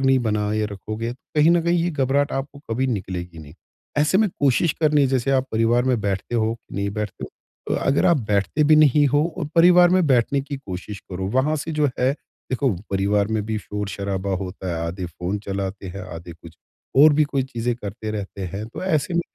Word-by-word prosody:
नहीं 135 -1 +4
बनाए 105 0 0
रखोगे, 110 +4 -5
कहीं 150 +5 +1
न 170 -1 +3
कहीं 170 +1 +2
ये 175 - 0
घबराहट 140 -1 +1
आपको 135 +1 -4
कभी 130 +4 0
निकलेगी 90 -7 -4
नहीं। 75 0 -12 0.4
ऐसे 155 +6 +3
में 220 -2 +3
कोशिश 140 +3 +3
करनी 150 -1 +4
है - - +4
जैसे 130 0 0
आप 130 0 +2
परिवार 115 +2 +3
में 125 -3 +1
बैठते 100 +3 -2
हो, 110 0 +1 0.2
नहीं 100 0 -2
बैठते 105 -2 -4
हो, - - -8 0.4
तो - - 0
अगर 135 +1 +3
आप 170 -3 +5
बैठते 100 - +1
भी 155 +1 +6
नहीं 150 -1 +5
हो 145 +3 +3 0.2
और 155 - -2
परिवार 175 +1 +7
में 185 -3 +3
बैठने 135 +1 +2
की 140 0 -6
कोशिश 100 -4 -7
करो 95 +1 -3
वहाँ 140 +5 +1
से 155 +3 -4
जो 150 -1 +2
है 130 +1 +3 0.4
देखो 130 0 +1 0.2
परिवार 100 +1 +1
में 110 -1 0
भी 110 -1 -2
शोर-शराबा 100 -1 -4
होता 95 0 -6
है, 80 - -3
आधे 90 +1 -4
फ़ोन 90 +4 -4
चलाते 95 0 -4
हैं, 95 +1 -7
आधे 85 +1 -8
कुछ 80 0 -15 0.5
और 155 -1 +8
भी 155 0 +4
कोई 140 -2 -1
चीज़ें 120 -2 -2
करते 105 0 -6
रहते 100 -2 -5
हैं। 105 +3 -5
तो - - -8
ऐसे 160 -1 0
में 170 - +3
120 Hz, 210 wpm, -22 LUFS, 100-145 Hz, 0.5 s, और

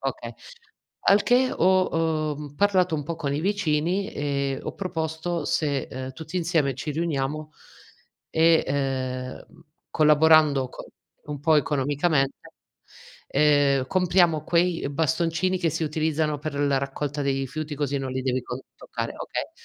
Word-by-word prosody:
okay. - - -4 0.8
Al 200 +1 +6
che 255 +1 +3
ho, 165 -4 +1
uhm, 145 -1 -9
parlato 185 -2 +2
un 150 - -2
po' 165 +2 -4
con 140 -2 -2
i 150 - -1
vicini 190 0 0
e 140 -2 -2
ho - - -5
proposto 165 -2 -3
se, 145 -3 0
ehm, 130 0 -6
tutti 160 +4 -7
insieme 165 -6 +1
ci 150 +4 -5
riuniamo 155 -1 -2 0.8
e, 165 0 +4
ehm, 130 -2 -2
mhmm, 165 - -20 0.3
collaborando 150 -3 +5
co - - -10 0.4
un 145 -2 -5
po' 155 +1 +4
economicamente, 145 0 +1 0.9
ehm, 140 -2 +3
compriamo 175 -2 +2
quei, 170 0 +1
ehm, 140 - -4
bastoncini 165 +4 0
che 170 -3 +1
si 165 +2 -3
utilizzano 155 0 0
per 145 0 -5
la 140 -1 +1
raccolta 140 +2 -3
dei 135 -1 0
rifiuti 150 +3 -4
così 145 -1 -1
non 130 -1 -4
li 130 - -2
devi 130 -1 -1
to 125 +2 -6
toccare, - - -5
okay. - - -4
150 Hz, 145 wpm, -25 LUFS, 140-165 Hz, 0.9 s, Al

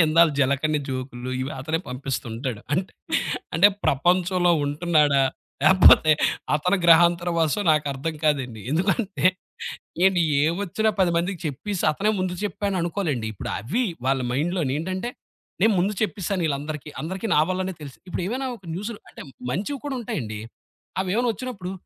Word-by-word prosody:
ఇదిగోండి - - +8
ఇందాక 165 +1 +5
జలకన్యా 140 +3 +1
జోక్లు 130 -1 -5
ఇవి 130 +2 -3
అతనే 155 +4 -1
పంపిస్తూ 130 +1 -4
ఉంటాడు. 115 -2 -4
అంట్ 185 +4 0 0.6
అంటే 175 +5 +7 0.2
ప్రపంచంలో 180 +4 +2
ఉంటున్నాడా 145 -2 +3 0.4
లేకపోతే 155 -2 +7 0.4
అతని 180 +6 +2
గ్రహాంతర 170 +1 +5
వాసో 160 +5 +1
నాకర్థం 150 +1 0
కాదండి. 130 -7 0
ఎందుకంటే, 190 - 0 0.8
ఏండి 190 -2 +4 0.2
ఏవోచ్చినా 200 +5 0
10 180 -2 +4
మందికి 175 +1 -2
చెప్పేసి 170 +8 -4
అతనే 200 +8 0
ముందు 185 -1 -1
చెప్పాను 200 0 -2
అనుకోలెండి 165 - -2
ఇప్పుడు - - -6
అవి 175 - -1 0.2
వాళ్ళ 135 0 +2
మైండ్‌లోనేంటంటే, 170 - -1 0.5
నేను 220 0 +5
ముందు 195 +4 +1
చెప్పేసానిళ్ళందరికీ 155 -8 -2
అందరికి 190 +7 -4
నా - - +5
వల్లనే 185 0 -1
తెలుసు. 140 -3 -9
ఇప్పుడు 180 - -3
ఏమైనా 260 +5 -2
ఒక 190 - -20
న్యూసులో 205 +4 -5
అంటే - - -11 0.3
మంచివి 210 - -2
కూడా 275 -2 -2
ఉంటాయండి. 110 - -4 0.6
అవేవైనా 215 +6 0
వచ్చినప్పుడు, 210 -7 -6
170 Hz, 135 wpm, -24 LUFS, 145-190 Hz, 0.8 s, ఇదిగోండి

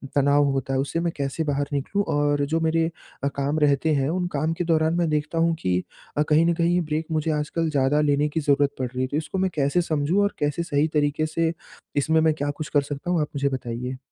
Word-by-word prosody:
तनाव 145 +1 +4
होता 135 0 -2
है, 130 - +1
उससे 145 +5 -1
मैं 170 0 0
कैसे 140 +3 -2
बाहर 145 -2 -1
निकलूँ 170 +9 0
और 145 -1 +2
जो 160 +3 0
मेरे 160 0 +2 0.4
अ, 140 - +2
काम 140 +2 -1
रहते 150 +1 +2
हैं 135 0 +1
उन 180 +1 -1
काम 155 +3 0
के 175 - -2
दौरान 160 -1 +2
मैं 170 -2 +1
देखता 150 +2 -1
हूँ 165 0 +3
कि 90 0 0 0.3
अ, 150 - +3
कहीं 155 +2 +5
न 170 - +3
कहीं 170 +1 +1
ये 180 - +2
ब्रेक 155 0 -2
मुझे 155 0 0
आजकल 155 +2 -1
ज़्यादा 140 +1 +2
लेने 145 0 +2
की 160 - -2
ज़रूरत 145 -1 +3
पड़ 130 - -1
रही 125 +1 -4
है, 130 - 0
तो 145 - -2
इसको 155 +5 -3
मैं 190 0 +1
कैसे 145 +4 +2
समझूँ 160 +3 +1
और 200 - 0
कैसे 150 +3 0
सही 150 -2 +1
तरीके 150 0 +1
से 160 +1 0 0.4
इसमें 160 +3 +3
मैं 160 -1 +3
क्या 145 -1 -2
कुछ 155 -3 -5
कर 145 - +5
सकता 145 +5 -5
हूँ 170 - +2
आप 150 - -1
मुझे 140 0 +1
बताइए? 125 0 -4
150 Hz, 245 wpm, -24 LUFS, 140-160 Hz, 0.4 s, कहीं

